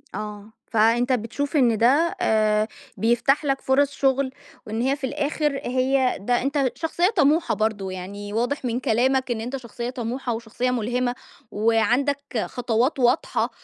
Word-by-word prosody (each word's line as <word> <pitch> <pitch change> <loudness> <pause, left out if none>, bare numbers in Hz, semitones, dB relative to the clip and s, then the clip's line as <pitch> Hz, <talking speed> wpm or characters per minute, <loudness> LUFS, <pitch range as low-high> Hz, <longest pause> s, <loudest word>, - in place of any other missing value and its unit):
آه. 210 0 -7 0.2
فأنت 230 +3 +3
بتشوف 250 +6 -2
إن 240 -6 +4
ده 280 +10 +3
آآ 215 -1 +2 0.3
بيفتح 240 +6 +2
لك 275 -1 0
فرص 280 +2 +2
شغل 270 -1 +1 0.3
وإن 220 +2 -3
هي 265 +3 +1
في 285 - -18
الآخر 290 0 -1
هي 260 +1 +1
ده 240 +5 0
أنت 275 -1 0
شخصية 345 +3 +1
طموحة 320 0 +3
برضه. 215 -3 -1
يعني 200 +3 -7
واضح 245 +5 -1
من 240 0 -1
كلامك 260 +2 +1
إن 225 -2 -2
أنت 250 +4 -4
شخصية 240 -1 -6
طموحة 245 0 -3
وشخصية 230 +2 -2
مُلهمة 245 +1 -1 0.4
وعندك 240 +4 +1
خطوات 245 +3 0
واضحة 245 +4 +2
245 Hz, 145 wpm, -23 LUFS, 225-275 Hz, 0.4 s, إن